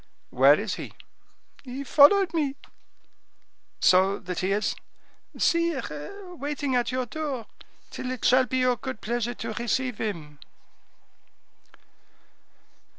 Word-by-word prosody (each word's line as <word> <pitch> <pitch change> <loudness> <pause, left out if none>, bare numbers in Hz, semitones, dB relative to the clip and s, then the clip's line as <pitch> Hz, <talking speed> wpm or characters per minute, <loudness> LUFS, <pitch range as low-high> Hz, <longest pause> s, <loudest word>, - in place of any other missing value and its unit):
"Where - - +6
is - - -3
he?" - - -8 0.7
"He 265 +1 -6
followed 330 +7 +5
me." 290 -4 0 1.3
"So 190 +2 +4
that 180 -1 -5
he 185 +1 -1
is—" 205 +2 0 0.6
"Sire, 335 - -1
waiting 285 -3 -2
at 240 -1 +1
your 255 0 -1
door, 275 -3 -4 0.5
till 255 - -5
it 255 -2 -4
shall 255 0 +5
be 260 - -1
your 255 -1 +2
good 260 -1 -6
pleasure 240 +1 -2
to 225 -1 -5
receive 240 +1 -2
him." 155 -9 -5
255 Hz, 115 wpm, -26 LUFS, 215-285 Hz, 1.3 s, Where